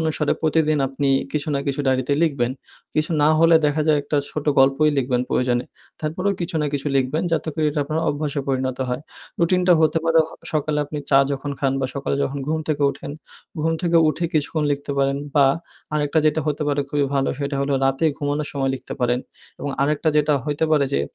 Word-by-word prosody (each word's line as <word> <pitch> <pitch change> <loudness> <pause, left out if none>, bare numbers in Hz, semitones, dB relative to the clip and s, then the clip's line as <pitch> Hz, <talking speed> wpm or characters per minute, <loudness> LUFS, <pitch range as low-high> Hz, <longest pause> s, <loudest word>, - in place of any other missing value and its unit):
অনুসারে 155 -2 0
প্রতিদিন 155 -1 +2
আপনি 140 +1 -1 0.2
কিছু 150 0 -2
না - - +1
কিছু 140 0 -1
ডায়েরিতে 130 +1 +1
লিখবেন। 135 -6 +1 0.4
কিছু 155 +2 0
না 150 - +5
হলে 165 0 +6
দেখা 150 +1 +1
যায় 150 -1 +4
একটা 145 +1 -2
ছোট 150 - -4
গল্পই 135 +3 +4
লিখবেন 125 -1 +1
প্রয়োজনে। 125 -1 +1 0.4
তারপরেও 180 +6 -1
কিছু 170 -1 -3
না - - 0
কিছু 140 +1 -3
লিখবেন 135 +5 0
যাতে 165 - 0
করে 155 - 0
এটা 145 - -1
আপনার 155 +2 -2
অভ্যাসে 145 -1 -2
পরিণত 130 -1 -1
হয়। 125 +2 -3 0.4
রুটিনটা 180 +1 +3
হতে 160 0 +3
পারে 165 0 +4
হ - - -15 0.2
সকালে 150 -1 0
আপনি 145 +1 -6
চা 135 - +6
যখন 140 +1 -4
খান 135 -1 +1
বা 130 - 0
সকালে 140 0 -2
যখন 140 +1 -2
ঘুম 160 - 0
থেকে 150 -2 0
উঠেন, 140 - -8 0.5
ঘুম 165 +1 +1
থেকে 170 -1 +2
উঠে 165 +3 -1
কিছুক্ষণ 155 0 0
লিখতে 140 0 -4
পারেন 140 0 +2 0.2
বা 140 -2 +6 0.5
আরেকটা 150 +1 +1
যেটা 155 +1 +2
হতে 150 0 -1
পারে 145 0 +1
খুবই 145 -1 +1
ভালো 135 -1 +1
সেটা 140 0 -2
হল 140 - -1
রাতে 135 +3 +1
ঘুমানোর 145 +1 -2
সময় 135 -2 0
লিখতে 130 - -8
পারেন। 120 0 +2 0.4
এবং 145 - -3
আরেকটা 150 +2 +1
যেটা 150 0 +3
হইতে 150 +1 0
পারে 145 -2 +4
যে 70 - +2
145 Hz, 200 wpm, -22 LUFS, 140-155 Hz, 0.5 s, হলে